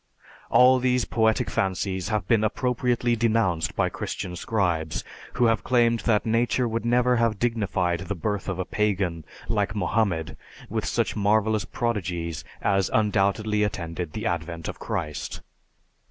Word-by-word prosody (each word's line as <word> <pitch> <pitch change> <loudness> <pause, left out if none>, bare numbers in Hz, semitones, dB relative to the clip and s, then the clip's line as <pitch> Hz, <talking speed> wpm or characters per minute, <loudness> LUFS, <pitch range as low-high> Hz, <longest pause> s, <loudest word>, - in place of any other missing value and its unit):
All 130 +1 +6
these 125 -1 +1
poetic 110 -1 +1
fancies 95 0 -1
have 105 -4 -1
been 115 -2 +3
appropriately 120 +1 +1
denounced 110 -8 +1
by - - +1
Christian 90 -1 -5
scribes, 85 -6 -1 0.3
who 120 - +2
have 115 -2 +2
claimed 120 -2 +3
that 105 -2 +3
nature 120 +2 +1
would 115 0 -2
never 125 +1 +3
have 115 -3 +1
dignified 100 -7 0
the 95 +2 -4
birth 100 +3 -3
of 95 - -2
a 95 - -2
pagan 95 -6 -1 0.2
like 105 -2 0
Mohammed 95 -7 0 0.3
with - - -2
such - - 0
marvelous 110 +1 +2
prodigies 90 -10 -3 0.2
as 95 -2 +2
undoubtedly 105 0 +1
attended 85 -5 -3
the 110 +1 -4
advent 85 -3 -3
of - - -6
Christ. 75 -1 -4
105 Hz, 140 wpm, -25 LUFS, 90-115 Hz, 0.3 s, All